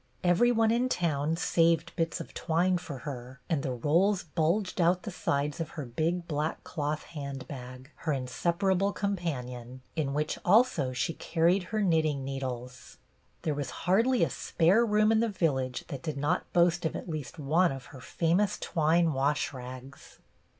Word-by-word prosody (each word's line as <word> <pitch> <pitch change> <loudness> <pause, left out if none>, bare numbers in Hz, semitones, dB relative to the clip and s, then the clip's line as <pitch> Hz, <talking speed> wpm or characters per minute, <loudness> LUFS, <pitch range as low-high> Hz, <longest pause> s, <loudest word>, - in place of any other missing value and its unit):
Every 180 +7 +4
one 225 -1 +3
in 245 +2 +2
town 160 - 0
saved 165 -1 +2
bits 165 -1 -1
of - - -8
twine 175 +3 +1
for 155 -6 -7
her, 130 -2 -7
and 155 -4 0
the 130 - -2
rolls 170 - +2
bulged 175 +5 0
out 175 +2 +3
the 215 - -5
sides 145 -3 -1
of 165 -1 -3
her 150 - -3
big 165 +8 -1
black 150 0 -2
cloth 150 -1 -3
handbag, 135 -2 -8
her 160 - -2
inseparable 175 +9 0
companion, 130 - -4
in 145 -4 -1
which 150 +1 -1
also 205 - +4
she 130 +6 -1
carried 175 +4 +1
her 215 +1 -1
knitting 155 -6 +2
needles. 125 -2 -6 0.5
There 155 - 0
was 145 -2 -3 0.2
hardly 230 +8 +3
a - - +1
spare 180 +8 +3
room 215 -1 +3
in 220 - +4
the 230 0 +2
village 135 -10 -1
that 140 -5 -5
did 155 -2 -4
not 145 +1 -1
boast 175 0 +3
of 160 - -1
at - - -6
least 155 -1 -5
one 160 +4 +2
of 135 -2 -7
her 130 - -10
famous 175 +9 +1
twine 165 0 +2
wash 140 +2 0
rags. 130 +1 -10
160 Hz, 165 wpm, -29 LUFS, 135-180 Hz, 0.5 s, Every